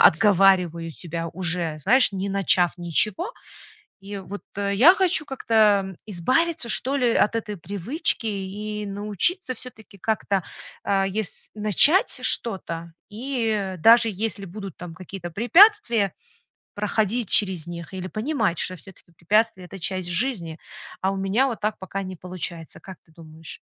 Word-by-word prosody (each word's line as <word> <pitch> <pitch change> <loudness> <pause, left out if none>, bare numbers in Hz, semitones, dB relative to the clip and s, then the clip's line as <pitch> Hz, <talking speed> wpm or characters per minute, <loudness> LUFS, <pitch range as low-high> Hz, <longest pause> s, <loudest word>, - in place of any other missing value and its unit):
отговариваю 180 -3 +4
себя 165 0 -6
уже, 170 -2 -2
знаешь, 245 - +4
не 195 +1 -3
начав 185 -2 +2
ничего. 195 - 0 0.7
И 200 +1 -7
вот 195 +2 -8 0.2
я 200 - +5
хочу 370 -5 +1
как-то 210 - +2
избавиться, 255 - 0
что 270 +5 +1
ли, 245 -3 +2
от 220 - +2
этой 210 -2 -4
привычки 205 - -2
и 210 +1 -4
научиться 210 - -1
всё-таки 220 -4 -13
как-то, 200 -2 -1 0.4
а, 195 -1 +1
ес 200 0 -4
начать 245 - +3
что-то 170 -6 +1 0.2
и 220 -5 -2
даже 230 +6 +6
если 205 0 -2
будут 195 0 -8
там 175 -2 -9
какие-то 185 0 -8
препятствия, 240 - +4 0.6
проходить 210 +1 -1
через 185 -6 +1
них 170 +1 -8
или 185 0 -5
понимать, 215 - -1
что 185 - -1
всё-таки 180 0 -16
препятствия- 195 +3 +1
это 195 - -10
часть 185 0 -3
жизни, 175 -5 -2 0.4
а 190 - +1
у 195 - -3
меня 195 +7 +1
вот 235 -4 -4
так 215 +1 -1
пока 195 +1 -5
не 185 -1 -7
получается, 170 -2 -6
как 190 -2 -11
ты - - -25
думаешь? 160 -1 -11
200 Hz, 140 wpm, -24 LUFS, 180-225 Hz, 0.7 s, даже